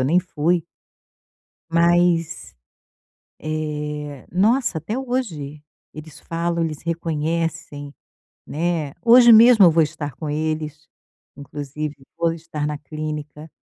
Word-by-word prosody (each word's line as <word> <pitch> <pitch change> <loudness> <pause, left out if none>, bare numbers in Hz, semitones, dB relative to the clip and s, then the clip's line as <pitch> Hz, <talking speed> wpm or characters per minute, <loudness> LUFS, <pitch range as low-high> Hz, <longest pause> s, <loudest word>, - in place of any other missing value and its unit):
eu - - +1
nem 170 +5 +4
fui. 170 -1 0 1.1
Mas, 170 0 +2 0.9
eh, 150 -2 -5
nossa, 215 +1 +2
até 190 - -4
hoje 195 - -4 0.3
eles 155 0 -11
falam, 170 0 -2
eles 155 -3 -4
reconhecem, 165 -2 -3 0.5
né. 160 -2 -2
Hoje 240 0 +8
mesmo 225 -2 +8
eu 170 - +6
vou 160 0 +4
estar 150 -3 -5
com 155 0 -6
eles. 155 +1 -3 0.5
Inclusive, 145 +1 -6 0.2
vou 165 -1 +1
estar 155 -2 -5
na 150 -1 -3
clínica. 150 0 -7
160 Hz, 110 wpm, -21 LUFS, 150-170 Hz, 1.1 s, Hoje